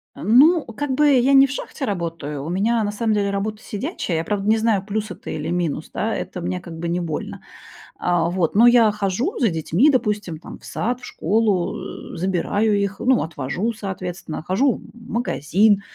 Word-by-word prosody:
Э, - - -10
ну, 285 - +6
как 265 +4 -4
бы, 290 +2 +4
я 265 +1 +4
не 270 0 +8
в 265 - -7
шахте 275 0 -5
работаю, 165 -7 -4
у - - -4
меня 220 +6 +1
на 205 - -1
самом 220 +1 0
деле 200 -1 +1
работа 210 +2 -3
сидячая. 210 - -3
Я, 160 - -1
правда, 200 +2 -2
не 220 - +5
знаю, 220 -3 +1
плюс 215 -1 -3
это - - -9
или 155 +1 -3
минус. 175 -4 -2
Да, - - -1
это - - -5
мне, 90 +1 -2
как 165 -1 -9
бы 170 - -3
не, 175 +1 0
больно. 160 -3 -5 0.6
Э, 175 -1 +1
вот, 175 -1 0
но 235 +3 +7
я 235 -3 +6
хожу 210 - -1
за 230 - +3
детьми, 170 - +2
допустим, 210 - 0
там - - -11
в - - -16
сад, 245 +3 -2
в - - -9
школу, 200 -1 -1
э, - - -7
забираю 200 +4 +1
их, 200 0 -2
ну 255 0 +3
отвожу, 160 - -3
соответственно, 180 -5 -6
хожу, 245 +9 +2
м, - - -13
в 235 -1 -14
магазин. 205 - +2
205 Hz, 205 wpm, -22 LUFS, 175-235 Hz, 0.6 s, не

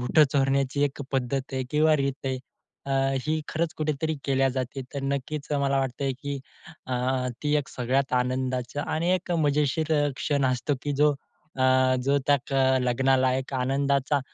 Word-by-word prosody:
बूट 125 +5 0
चोरण्याची 135 0 +1
एक 145 0 -3
पद्धत 135 +1 0
आहे 130 -1 -1
किंवा 155 +1 +4
रीत 140 -1 -2
आहे, 130 -1 -1 0.5
अ, - - -4 0.4
ही 155 +1 +1
खरंच 165 +1 -1
कुठेतरी 155 +1 -1
केल्या 135 -1 +2
जाते. 130 +1 -3
तर 140 - -3
नक्कीच 140 +2 -3
मला 140 0 +2
वाटतं, 135 +1 -1
की 140 -1 -3 0.5
अ, 130 - -2 0.5
ती 150 0 +1
एक 140 - -11
सगळ्यात 130 +2 -1
आनंदाचं 130 +1 -2
आणि 165 +3 0
एक 180 -1 -3
मजेशीर 150 +2 +1
अ, - - +1
क्षण 140 -1 0
असतो, 130 +4 -1
की 145 - -1
जो 150 -1 +5 0.4
अ, 130 - 0 0.4
जो 140 +1 +3
त्या 145 - +5 0.4
अ, - - +3
लग्नाला 130 +1 +2
एक 130 +1 -5
आनंदाचा 140 +2 +1
140 Hz, 165 wpm, -26 LUFS, 130-145 Hz, 0.5 s, जो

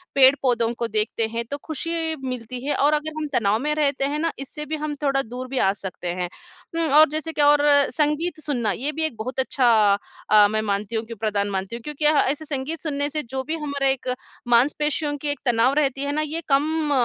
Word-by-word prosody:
पेड़-पौधों 260 -4 +4
को 235 - 0
देखते 220 +1 0
हैं 230 +1 -3
तो 285 - -2
खुशी 325 +1 -2
मिलती 250 0 -5
है 290 - 0
और 295 +2 +3
अगर 305 +1 -1
हम 305 -1 -2
तनाव 215 -1 +2
में 300 +3 -1
रहते 280 -2 +1
हैं 290 +2 -2
ना 330 0 0
इससे 300 +2 -7
भी 315 - -3
हम 300 -1 -3
थोड़ा 275 -1 +2
दूर 250 +2 -7
भी 265 +1 -5
आ 195 - +3
सकते 185 -2 -6
हैं। 180 0 -3 0.5
उ, - - -2 0.2
और 310 0 +8
जैसे 315 +1 -2
कि - - +1
और 290 0 +5 0.3
संगीत 305 +2 0
सुनना 240 -8 0
ये 270 +10 -2
भी 315 +1 -3
एक 310 - -3
बहुत 255 +4 -5
अच्छा 260 -1 +2 0.6
अ, 210 -1 +7
मैं 215 +1 -1
मानती 205 +1 -2
हूँ 220 0 -1
कि 230 - -8
प्रदान 205 -1 -1
मानती 195 +3 -3
हूँ। 235 - -7
क्योंकि 300 0 -4
अह 300 -1 +5
ऐसे 310 +2 -6
संगीत 290 +3 -4
सुनने 290 -2 -2
से 305 +1 -3
जो 265 +2 -4
भी 315 +3 -3
हमारा 280 -2 -1
एक 265 -1 0 0.4
मांसपेशियों 295 +4 +2
की 295 - -5
एक 290 - -1
तनाव 240 +2 +3
रहती 275 -2 0
है 285 - -1
ना 305 +1 0
ये 310 +2 -3
कम 300 +2 +1
275 Hz, 225 wpm, -23 LUFS, 235-300 Hz, 0.6 s, और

